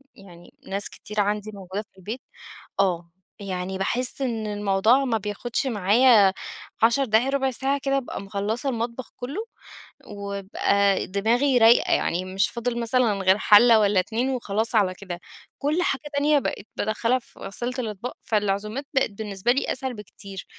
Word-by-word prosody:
يعني 175 -3 -15
ناس 200 +1 -1
كتير 210 0 -7
عندي 210 +1 -1
موجودة 195 0 -5
في - - -35
البيت 220 +7 -6 0.6
آه، 175 -3 0 0.3
يعني 190 -1 -4
باحسّ 245 +7 -1
إن 225 -4 -2
الموضوع 210 +5 +2
ما 230 -4 +1
بياخدش 215 +6 -3
معايا 210 -1 +5 0.5
10 235 +4 +4
دقايق 225 +3 +2
ربع 270 -1 +1
ساعة 270 +3 -1
كده 275 0 +1
أبقى 265 -6 -4
مخلَّصة 205 +6 -2
المطبخ 235 0 -4
كلُّه، 285 - -5 0.6
وابقى 200 -1 0
دماغي 235 +7 +2
رايقة 230 0 +5
يعني 180 +2 0
مش 190 +2 0
فاضل 235 0 -3
مثلًا 235 -1 +2
غير 190 0 +3
حَلَّة 220 +2 +7
والَّا 200 -2 +3
اتنين 235 +7 -1
وخلاص 225 -3 -1
على 195 -4 +3
كده، 180 -2 -7 0.4
كل 305 +5 0
حاجة 270 - 0
تانية 290 +1 +3
بقِت 215 -6 -4
بادخَّلها 230 +3 0
في 235 - -20
غسالة 240 +5 -4
الاطباق، 225 0 -5
فالعزومات 210 +4 -1
بقِت 265 - +2
بالنسبة 205 +1 -1
لي 265 - 0
أسهل 260 -1 -4
بكتير، 200 -3 -9
215 Hz, 150 wpm, -24 LUFS, 200-250 Hz, 0.6 s, حَلَّة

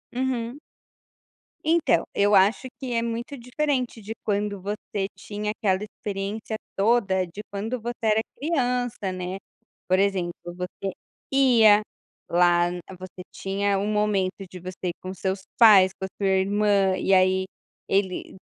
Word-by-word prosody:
Uhum. 255 0 -2 1.1
Então, 320 - +3
eu 205 0 +3
acho 205 +7 +4
que 255 -2 -4
é 230 - +1
muito 235 +4 -4
diferente 250 -1 -2
de 215 +2 -6
quando 205 -1 -1
você 200 0 -3
tinha 210 +2 -4
aquela 195 -2 0
experiência 205 +1 -5 0.2
toda 195 -3 +2
de 180 +4 -9
quando 220 +5 -3
você 240 +1 -3
era 220 0 +3
criança, 250 - -1
né. 185 +1 -4 0.5
Por 185 +1 +3
exemplo, 190 -3 +1
você 180 +2 -5 0.4
ia 230 -6 +6 0.5
lá 175 0 +4
n 180 0 -5 0.2
você 185 0 -9
tinha 200 +1 -1
um 205 - -1
momento 200 -2 0
de 180 - -9
você 185 +1 -6
ir 170 - -3
com 185 0 -6
seus 190 +1 -2 0.2
pais, 205 -5 +8
com 190 - -2
a 190 - -7
sua - - +3
irmã, 195 0 +2
e 195 - +1
aí 185 0 +4 0.4
ele 190 -2 -1
200 Hz, 145 wpm, -25 LUFS, 190-230 Hz, 1.1 s, pais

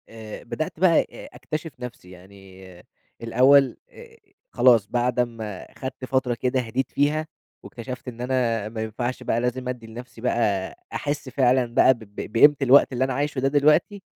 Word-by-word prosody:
آآ، 110 -1 -10
بدأت 155 +5 -5
بقى 175 -3 +5
أ - - -12
أكتشف 155 +6 -5
نفْسي، 120 -7 -9
يعني 95 +1 -15 0.6
الأول 130 +4 +4
آآ، 460 -1 -15 0.3
خلاص 115 -5 +4
بَعد 125 +1 -1
أمّا 115 -5 -3
خَدت 130 -1 -6
فترة 130 -1 0
كده 125 +2 -1
هدِيت 125 +2 -3
فيها، 150 +2 0 0.4
واكتشفت 125 +2 -8
إن 120 -1 -7
أنا 120 -4 -1
ما 110 0 -6
ينفعش 120 +3 -4
بقى 115 - 0
لازم 125 +1 -2
أدّي 120 -3 -6
لنفْسي 115 +1 -11
بقى 105 -6 0 0.2
أحس 145 -2 -3
فعلًا 130 -1 +2
بقى 130 - +6
ب 120 - -15
ب 105 -1 -9
بقيمة 145 +6 +6
الوقت 135 +1 +5
اللي 125 +1 0
أنا 130 - -1
عايشه 145 +1 -2
ده 135 - +1
دلوقتي، 150 +8 +2
125 Hz, 165 wpm, -24 LUFS, 115-135 Hz, 0.6 s, بقى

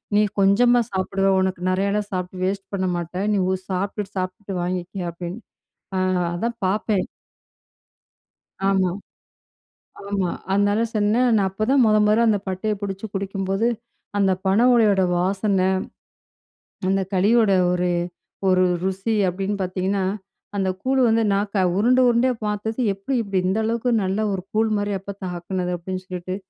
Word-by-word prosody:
"நீ 210 - +5 0.2
கொஞ்சமா 240 +5 +5
சாப்பிடுவ. 195 +1 +1
உனக்கு 185 -1 -1
நெறையல்லாம் 200 +2 0
சாப்பிட்டு 180 0 -3
வேஸ்ட் 195 0 -2
பண்ண 190 -1 -1
மாட்டேன். 180 +4 -3
நீ 200 - +2
ஒ - - +2
சாப்ட்டுட்டு 195 +2 -3
சாப்ட்டுட்டு 185 +1 -5
வாங்கிக்க." 180 0 -3
அப்படீன்னு. 175 +6 -7 0.6
அ - - +1 0.4
அதான் 230 +5 -2
பாப்பேன். 205 0 0 1.6
ஆமா. 190 -2 +2 1.2
ஆமா. 195 -3 0 0.2
அதனால 205 +2 +2
சொன்னேன். 215 +4 +3
நான் 200 -3 +3
அப்ப 215 +3 -2
தான் 270 -3 +5
மொத 215 - +4
மொதல்ல 215 +3 +4
அந்த 205 -2 +2
பட்டையை 190 +3 -1
புடிச்சு 195 +1 -4
குடிக்கும்போது, 195 +2 -1 0.5
அந்த 195 -1 +3
பனை 195 +5 +3
ஓலையோட 210 -5 +4
வாசனை, 190 +1 +1 1.2
அந்த 195 0 +2
களியோட 210 +3 +4 0.2
ஒரு 180 0 0 0.6
ஒரு 185 0 +4 0.2
"ருசி" 190 +4 -1
அப்படீன்னு 195 +3 -2
பாத்தீங்கன்னா, 190 +1 -1 0.5
"அந்த 190 -1 0
கூழு 265 +1 +1
வந்து 225 0 +3
நாக்க 200 -1 0
"உருண்டை 250 +4 +4
உருண்டையா 245 +2 +2
பாத்தது, 210 +3 -3
எப்படி 200 +8 -3
இப்படி 195 -3 -1
இந்த 190 +3 +1
அளவுக்கு 235 +2 0
நல்லா 195 +3 0
ஒரு 190 - -3
கூழ் 220 +1 +2
மாரி 205 0 -1
எப்பத்தா 195 0 -8
ஆக்குனது?" 180 +1 -3
அப்படீன்னு 185 +2 -5
சொல்லிட்டு 185 0 -5
195 Hz, 140 wpm, -22 LUFS, 185-215 Hz, 1.6 s, நீ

